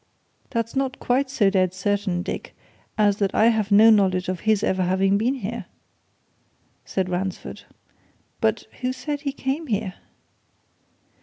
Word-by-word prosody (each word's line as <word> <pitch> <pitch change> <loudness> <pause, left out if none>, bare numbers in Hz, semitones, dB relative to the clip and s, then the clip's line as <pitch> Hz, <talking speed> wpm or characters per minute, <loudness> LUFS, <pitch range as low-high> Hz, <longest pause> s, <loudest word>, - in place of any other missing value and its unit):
"That's 230 +1 -2
not 270 -1 -1
quite 260 +2 +1
so 210 -7 +2
dead 185 -2 +1
certain, 195 -2 -1
Dick, - - -6 0.4
as 205 -2 +3
that 200 -2 -1
I 220 +2 +5
have 215 -3 0
no 215 +3 +8
knowledge 185 -4 +2
of 185 -2 -2
his 215 0 +1
ever 190 0 +1
having 190 +2 +2
been 235 +6 +1
here," 235 -1 -5 1.2
said 190 -1 -1
Ransford. 185 +1 -4 0.7
"But - - 0 0.2
who 255 0 0
says 285 +3 -4
he 285 -2 -2
came 275 +3 -3
here?" 205 -4 -1
210 Hz, 145 wpm, -23 LUFS, 190-250 Hz, 1.2 s, no